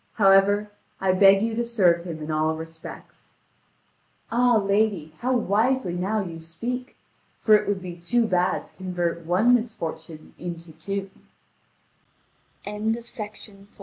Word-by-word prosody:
However, 200 +1 +4 0.3
I 190 -1 +2
beg 195 +2 +6
you 225 0 -1
to 235 +2 0
serve 180 -8 +2
him 160 -3 -6
in 155 - -4
all 155 +1 +1
respects." 160 0 -11 1.0
"Ah, 245 0 +4
lady, 200 -6 +1
how 255 +2 +1
wisely 225 -1 +1
now 195 +5 -1
you 165 -3 -7
speak! 235 +11 -5 0.5
For 215 - +5
it 210 - +5
would 200 -2 -1
be 175 -1 -7
too 230 +8 +1
bad 180 -3 +1
to - - -20
convert 175 -3 -3
one 205 +8 +4
misfortune 165 -9 -3
into 170 -1 -7
two." 195 +5 -4
(Vv. 190 0 -18 1.4
3131 210 +2 -1
3254.) 210 -3 -8
195 Hz, 140 wpm, -25 LUFS, 170-220 Hz, 1.4 s, beg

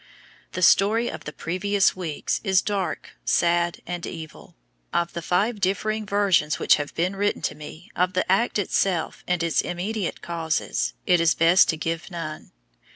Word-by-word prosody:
The 185 - -2
story 220 +6 +4
of - - -9
the 150 - -5
previous 190 +5 +1
weeks 170 -5 -3
is 190 -3 +3
dark, 200 -3 -3
sad, 170 0 +1
and 175 0 -5
evil. 160 +1 -9 0.4
Of 170 0 0
the 170 - -4
five 205 +7 0
differing 215 +3 -1
versions 195 -7 +2
which - - +4
have 145 -1 -5
been 180 +4 0
written 205 +1 -1
to - - -1
me 155 +3 -11
of 180 +1 +1
the 185 - +1
act 195 +6 +2
itself 190 -3 0
and 180 -1 0
its 165 -1 +2
immediate 190 +2 -3
causes, 165 -2 -2
it 180 -2 +4
is 165 -1 +3
best 175 +6 +5
to 160 - +1
give 165 +1 -3
none. 165 -4 -7
180 Hz, 165 wpm, -24 LUFS, 165-195 Hz, 0.4 s, best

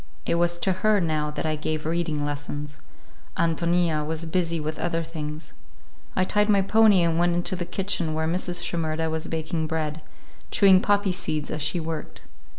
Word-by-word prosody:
It - - +1
was 170 0 +2
to 190 - 0
her, 215 0 +4
now, 155 -3 0
that 150 - -4
I 155 0 0
gave 155 0 -3
reading 160 -2 -1
lessons; 145 0 -5 0.6
Ántonia 170 -1 +1
was 160 +2 -3
busy 170 0 0
with 155 +1 -4
other 165 -1 -1
things. 155 -1 -7 0.6
I 185 - +3
tied 210 +3 +2
my 200 -2 +4
pony 210 -2 +5
and 165 -1 +1
went 175 0 +2
into 175 +2 0
the 175 -1 -3
kitchen 185 -3 -1
where 160 0 0
Mrs. 175 +1 -1
Shimerda 160 -1 -1
was 160 0 -3
baking 160 0 -2
bread, 155 -1 -3 0.5
chewing 190 -2 +6
poppy 205 -2 +2
seeds 155 -5 -2
as 155 - -3
she 155 +5 0
worked. 160 -1 -6
165 Hz, 175 wpm, -25 LUFS, 155-180 Hz, 0.6 s, chewing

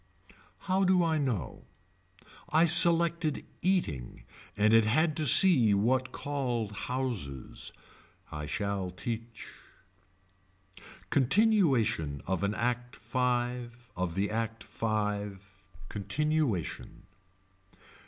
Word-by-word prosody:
How 190 +1 0
do 185 -1 +3
I 160 -2 +1
know. 115 - -3 0.8
I 160 +2 +4
selected 170 -2 +4 0.2
eating 80 - -2 0.3
and 105 +2 +3
it 115 0 +6
had 155 +9 +1
to 155 -2 +1
see 125 - +6
what 130 +5 0
called 125 -8 -3
houses. 105 - -5 0.6
I 75 0 -6
shall 100 +1 -3
teach. 115 +6 -6 1.7
Continuation 130 - +2
of 95 0 -2
an 100 +1 -1
Act 125 +1 -2
Five 120 -1 -3
of 90 -2 -3
the 100 +2 -1
Act 115 0 -3
Five. 100 -3 -4 0.2
Continuation. 120 - -2
120 Hz, 95 wpm, -29 LUFS, 100-150 Hz, 1.7 s, it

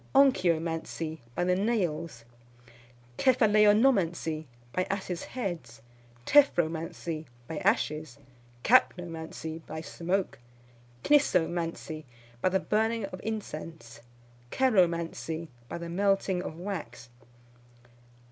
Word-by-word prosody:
Onchyomancy, 165 - +2 0.2
by - - 0
the 180 0 +2
nails. 170 - -1 0.9
Cephaleonomancy, 210 -9 +4 0.3
by 185 - +1
asses' 190 -3 -3
heads. 165 - -5 0.4
Tephromancy, 165 - +2 0.2
by 160 - -4
ashes. 150 -4 0 0.5
Kapnomancy, 165 -8 +1
by 160 +1 -5
smoke. 175 +4 -2 0.6
Knissomancy, 170 - +1 0.4
by - - +3
the 190 +1 +2
burning 220 +1 0
of 185 -2 -8
incense. 165 - -6 0.5
Ceromancy, 170 -8 +1 0.2
by - - -4
the 170 0 -6
melting 195 0 +1
of 160 -3 -6
wax. 160 - -6
175 Hz, 85 wpm, -29 LUFS, 160-205 Hz, 0.9 s, Cephaleonomancy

